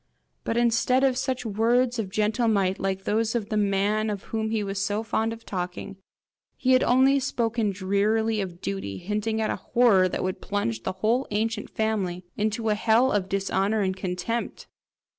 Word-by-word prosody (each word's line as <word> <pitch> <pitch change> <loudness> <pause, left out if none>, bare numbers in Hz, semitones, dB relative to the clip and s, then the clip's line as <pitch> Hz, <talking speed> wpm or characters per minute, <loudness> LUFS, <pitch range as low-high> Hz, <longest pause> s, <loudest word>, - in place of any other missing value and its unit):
But 230 - -1
instead 240 +2 +2
of 265 -2 +3
such 260 -1 -2
words 235 +3 +1
of 205 -4 -2
gentle 215 +4 +1
might, 195 -3 +1
like 195 0 -2
those 225 +3 0
of 220 -3 -2
the 215 - -1
man 205 +1 +1
of 205 -2 -4
whom 220 -1 -3
he 220 -1 0
was 195 -1 -2
so 205 +2 -1
fond 225 0 -1
of 230 0 -9
talking, 180 0 -5 0.6
he 260 -2 +1
had 255 0 +5
only 265 +3 +4
spoken 235 -4 0
drearily 205 +3 +1
of 175 -3 -6
duty, 100 0 -4
hinting 210 - -2
at 220 - 0
a - - -2
horror 205 -7 +3
that - - -3
would 185 0 -3
plunge 115 - -2
the 185 - -2
whole 245 +5 +2
ancient 215 +1 -2
family 195 -5 -2
into 220 +1 -1
a - - +4
hell 225 +5 +3
of 195 -2 0
dishonour 195 +2 0
and 190 -1 0
contempt! 185 +5 -3
215 Hz, 180 wpm, -26 LUFS, 195-230 Hz, 0.6 s, had